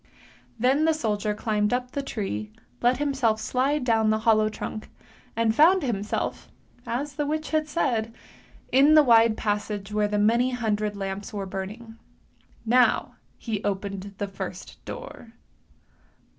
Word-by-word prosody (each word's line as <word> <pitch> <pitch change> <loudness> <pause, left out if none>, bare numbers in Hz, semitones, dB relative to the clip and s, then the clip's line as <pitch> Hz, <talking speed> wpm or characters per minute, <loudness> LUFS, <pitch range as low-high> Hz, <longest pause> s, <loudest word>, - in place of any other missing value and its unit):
Then 265 +6 +2
the 320 -1 +3
soldier 210 -7 -1
climbed 210 -1 0
up 250 0 -2
the 280 - -2
tree, 105 - -4 0.3
let 245 +1 +3
himself 265 -6 +1
slide 260 +6 0
down 225 -3 +2
the 215 - +3
hollow 220 -1 +3
trunk, 215 0 -6 0.5
and 230 -1 +2
found 330 +7 +5
himself, 210 -5 -3 0.4
as 270 +5 -3
the 295 0 -2
witch 310 +1 -3
had 310 -1 +1
said, 235 -8 0 0.6
in 280 +4 +6
the 305 - +8
wide 230 -3 +5
passage 210 -1 -3
where 210 0 +2
the 210 0 -1
many 235 +5 +3
hundred 215 -3 -1
lamps 195 0 -5
were 200 -2 -4
burning. 210 +5 -7 0.7
Now 245 +2 +3 0.2
he 220 -3 -4
opened 200 0 -4
the 205 - -3
first 195 0 -8
door. 240 - -9
225 Hz, 145 wpm, -25 LUFS, 210-260 Hz, 0.7 s, the